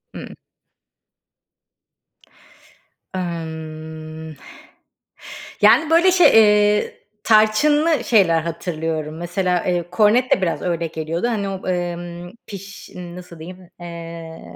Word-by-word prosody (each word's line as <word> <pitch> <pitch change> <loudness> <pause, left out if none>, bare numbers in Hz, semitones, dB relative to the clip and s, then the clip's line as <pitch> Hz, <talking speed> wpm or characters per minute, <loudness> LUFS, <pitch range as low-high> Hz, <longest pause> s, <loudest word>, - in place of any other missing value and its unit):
Hıı. - - -7 2.9
Imm. 160 -2 -7 1.3
Yani 315 0 +5
böyle 345 +3 +5
şey, 360 -1 +6
eee, 210 -1 +4 0.3
tarçınlı 280 +7 +3
şeyler 180 -9 +3
hatırlıyorum. 160 -2 -4
Mesela, 180 +1 -1
eee, 175 -2 -1
kornet 225 +6 +3
de 190 - +3
biraz 170 -3 -1
öyle 170 -2 -2
geliyordu. 160 +6 -3
Hani 205 -4 -2
o, 190 -1 -6
emm, 175 -1 -4 0.2
piş 195 -1 -10
nasıl 175 -1 -10
diyeyim, 180 +2 -11
eee, 165 -1 -9
175 Hz, 95 wpm, -20 LUFS, 165-210 Hz, 2.9 s, şey